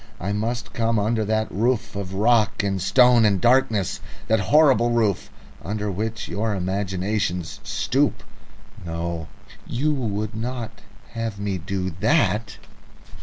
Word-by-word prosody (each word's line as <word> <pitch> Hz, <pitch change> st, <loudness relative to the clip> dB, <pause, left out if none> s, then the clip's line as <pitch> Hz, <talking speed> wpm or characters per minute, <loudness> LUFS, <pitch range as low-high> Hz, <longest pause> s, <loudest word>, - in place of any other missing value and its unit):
I 100 Hz, +3 st, -2 dB
must 115 Hz, +2 st, -3 dB
come 115 Hz, -1 st, +1 dB
under 110 Hz, +2 st, +1 dB
that 110 Hz, +1 st, 0 dB
roof 110 Hz, +1 st, 0 dB
of 95 Hz, -1 st, -5 dB
rock 110 Hz, 0 st, +2 dB
and 95 Hz, -2 st, -1 dB
stone 125 Hz, +4 st, +5 dB
and 100 Hz, -3 st, +3 dB
darkness, 110 Hz, -4 st, +2 dB, 0.3 s
that 110 Hz, 0 st, +4 dB
horrible 130 Hz, +3 st, +4 dB
roof 110 Hz, -5 st, +1 dB, 0.3 s
under 105 Hz, +2 st, -3 dB
which 110 Hz, +4 st, -3 dB
your 105 Hz, +1 st, -1 dB
imagination 95 Hz, 0 st, -1 dB
stoops... 100 Hz, -, -1 dB, 0.6 s
No; 85 Hz, -1 st, -4 dB, 0.4 s
you 150 Hz, +6 st, 0 dB
would 110 Hz, -5 st, -2 dB
not 115 Hz, 0 st, -4 dB, 0.4 s
have 115 Hz, -2 st, -3 dB
me 100 Hz, -2 st, -2 dB
do 95 Hz, +2 st, -3 dB
that?" 110 Hz, -, +1 dB
105 Hz, 125 wpm, -23 LUFS, 100-115 Hz, 0.6 s, stone